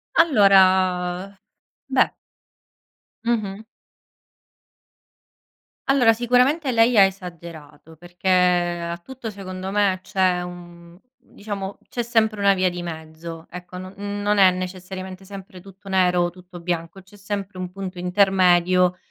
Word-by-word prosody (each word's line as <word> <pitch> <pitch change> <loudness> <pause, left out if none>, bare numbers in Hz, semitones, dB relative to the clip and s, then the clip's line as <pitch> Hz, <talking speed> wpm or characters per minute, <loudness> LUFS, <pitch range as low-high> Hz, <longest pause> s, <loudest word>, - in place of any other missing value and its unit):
Allora, 190 - +3 0.5
beh - - +2 1.1
Mh-mh. 215 -3 -1 2.3
Allora 255 -4 +5
sicuramente 250 +5 +2
lei 230 +1 +4
ha 200 - +9
esagerato 170 -5 -6
perché 175 +3 -9
a 175 -2 +2
tutto 240 +6 -8
secondo 190 -2 -7
me 200 -2 +2
c’è 185 -2 +1
un 175 -1 -11 0.2
diciamo, 200 -2 -7
c’è 240 - -3
sempre 220 -3 +1
una 200 0 +5
via 185 -1 +1
di 175 0 -6
mezzo 160 0 -8
ecco. 180 0 -9
Non 185 +1 -8 0.3
non 205 0 +1
è 190 -2 +7
necessariamente 185 +1 -7
sempre 190 -1 -11
tutto 195 +1 -16
nero 180 -2 +2
o 175 - 0
tutto 180 0 -13
bianco 170 +1 -4
c’è 190 +2 -20
sempre 200 -1 -5
un 180 -1 -5
punto 185 -1 -7
intermedio 180 -1 +3
185 Hz, 120 wpm, -22 LUFS, 175-200 Hz, 2.3 s, ha